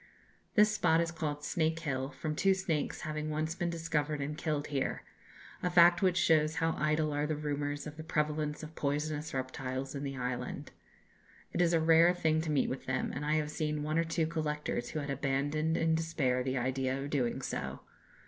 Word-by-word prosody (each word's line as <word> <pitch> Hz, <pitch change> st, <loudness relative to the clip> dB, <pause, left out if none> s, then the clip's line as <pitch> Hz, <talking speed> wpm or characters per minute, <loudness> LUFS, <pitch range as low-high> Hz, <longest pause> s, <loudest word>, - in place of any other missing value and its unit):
This 210 Hz, 0 st, +6 dB
spot 165 Hz, -5 st, +3 dB
is 170 Hz, 0 st, 0 dB
called 150 Hz, -3 st, -3 dB
Snake 160 Hz, 0 st, 0 dB
Hill, 135 Hz, -4 st, -2 dB
from 155 Hz, +1 st, -4 dB
two 195 Hz, +4 st, +3 dB
snakes 175 Hz, -6 st, -2 dB
having 155 Hz, -1 st, -3 dB
once 155 Hz, +1 st, -1 dB
been 175 Hz, 0 st, -2 dB
discovered 155 Hz, -3 st, -1 dB
and 145 Hz, +2 st, -3 dB
killed 150 Hz, -2 st, -1 dB
here, 140 Hz, -2 st, -1 dB, 0.6 s
a 180 Hz, -, +1 dB
fact 175 Hz, 0 st, +6 dB
which 185 Hz, -2 st, +3 dB
shows 160 Hz, -3 st, +3 dB
how 165 Hz, 0 st, +1 dB
idle 155 Hz, 0 st, +1 dB
are 145 Hz, +1 st, 0 dB
the 155 Hz, -, -1 dB
rumours 145 Hz, -1 st, -2 dB
of 150 Hz, 0 st, -8 dB
the 160 Hz, -, -6 dB
prevalence 150 Hz, -1 st, -1 dB
of 155 Hz, +1 st, -8 dB
poisonous 150 Hz, +1 st, -2 dB
reptiles 130 Hz, 0 st, -3 dB
in 140 Hz, -, -4 dB
the 135 Hz, -1 st, -4 dB
island. 125 Hz, 0 st, -4 dB, 0.8 s
It -, -, +1 dB
is 170 Hz, -1 st, +4 dB
a 165 Hz, -, +4 dB
rare 165 Hz, +2 st, +5 dB
thing 160 Hz, -2 st, +2 dB
to 160 Hz, -, -4 dB
meet 150 Hz, -3 st, +2 dB
with 130 Hz, -, -5 dB
them, 130 Hz, 0 st, -1 dB
and 145 Hz, -, -4 dB
I 150 Hz, +1 st, +1 dB
have 150 Hz, -1 st, 0 dB
seen 150 Hz, -1 st, -2 dB
one 155 Hz, +2 st, 0 dB
or -, -, +3 dB
two 165 Hz, 0 st, 0 dB
collectors 150 Hz, -5 st, -2 dB
who 155 Hz, -, -3 dB
had 140 Hz, -1 st, -4 dB
abandoned 145 Hz, +4 st, 0 dB
in 165 Hz, 0 st, +2 dB
despair 160 Hz, -6 st, +1 dB
the 130 Hz, +1 st, -1 dB
idea 130 Hz, +1 st, 0 dB
of 140 Hz, +1 st, -5 dB
doing 125 Hz, -5 st, 0 dB
so. -, -, -4 dB
150 Hz, 200 wpm, -32 LUFS, 145-160 Hz, 0.8 s, This